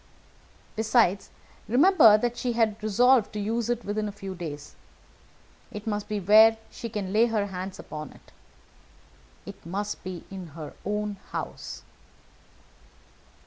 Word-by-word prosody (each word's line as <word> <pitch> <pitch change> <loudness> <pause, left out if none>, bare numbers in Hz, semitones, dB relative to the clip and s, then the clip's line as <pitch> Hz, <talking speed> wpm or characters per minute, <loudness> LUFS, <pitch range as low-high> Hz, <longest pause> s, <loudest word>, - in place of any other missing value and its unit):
Besides, 220 -3 +2 0.4
remember 250 - +6
that 240 +2 -1
she 245 0 -2
had 225 -2 +1
resolved 235 +2 +3
to 210 - -4
use 225 +3 -1
it 240 -1 -2
within 210 +1 -2
a - - -4
few 195 -1 -7
days. 155 -5 -8 0.9
It 210 0 -8
must 210 -2 -3
be 210 -1 -2
where 220 +4 +6
she 230 - -7
can 200 -3 -4
lay 225 +3 +4
her 215 -3 0
hands 190 -1 -6
upon 150 -2 -8
it. - - -20 1.1
It - - -11
must 200 +5 -4
be 185 -2 -6
in 190 -2 -7
her 155 -2 -7
own 210 0 -2
house." - - -6
210 Hz, 140 wpm, -26 LUFS, 195-225 Hz, 1.1 s, remember